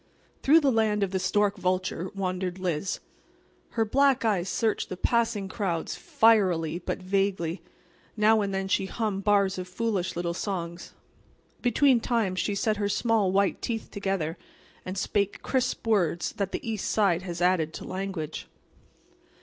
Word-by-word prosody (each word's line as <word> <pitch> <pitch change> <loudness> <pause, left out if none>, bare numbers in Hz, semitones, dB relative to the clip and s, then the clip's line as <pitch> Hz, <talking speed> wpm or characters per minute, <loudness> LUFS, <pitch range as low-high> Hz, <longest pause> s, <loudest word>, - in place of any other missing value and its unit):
Through 315 +4 +6
the 280 -3 +3
land 215 -3 +2
of 195 - -1
the 190 - 0
stork 205 +1 +1
vulture 185 -1 -1
wandered 185 -1 -2
Liz. 180 -1 -2 0.8
Her 225 - +3
black 270 +2 +3
eyes 195 -4 +1
searched 220 +1 0
the 185 - -5
passing 230 -2 +1
crowds 185 -4 -2
fierily 185 -8 +3
but - - -4
vaguely. 190 -3 0 0.6
Now 215 +1 +4
and 200 -1 -1
then 195 0 -2
she 190 0 +1
hummed 205 -2 -2
bars 200 -2 +2
of 180 - -5
foolish 190 -2 -2
little 170 0 -2
songs. 170 -2 -5 0.7
Between 250 +1 +4
times 220 -6 0
she 205 - 0
set 215 +1 0
her 205 -1 0
small, 210 -2 +2
white 195 +1 +1
teeth 225 -2 -4
together, 195 -5 -2 0.5
and 185 +1 -4
spake 200 +1 -1
crisp 255 -2 -1
words 175 -6 +1
that 195 -1 -3
the - - -5
east 220 -3 -2
side 195 -5 +2
has 175 -2 -5
added 175 -3 +2
to - - -7
language. 185 -5 -4
195 Hz, 155 wpm, -27 LUFS, 185-220 Hz, 0.8 s, Through